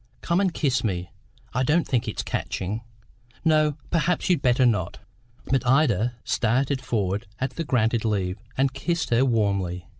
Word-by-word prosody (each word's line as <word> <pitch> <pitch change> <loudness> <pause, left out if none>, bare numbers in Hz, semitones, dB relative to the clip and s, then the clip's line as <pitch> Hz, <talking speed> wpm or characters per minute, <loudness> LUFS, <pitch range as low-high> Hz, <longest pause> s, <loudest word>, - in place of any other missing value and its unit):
Come 170 +3 +1
and 190 -2 +2
kiss 130 -6 0
me; 90 -5 -2 0.4
I 125 - 0
don't 150 +5 +2
think 125 -3 0
it's - - -3
catching. 105 +5 -3 0.6
No, 155 -2 +3
perhaps 175 +2 +1
you'd 170 -6 +2
better 130 -1 +3
not." 105 -8 +1 0.5
But 135 -2 +1
Ida 125 -3 +2
started 130 +4 +1
forward 100 -6 -1
at 130 +3 -2
the 165 - -4
granted 115 -5 +1
leave, 100 -3 -1 0.2
and 135 0 +2
kissed 165 +3 -2
her 120 +2 +4
warmly. 100 -7 0
125 Hz, 155 wpm, -25 LUFS, 105-145 Hz, 0.6 s, her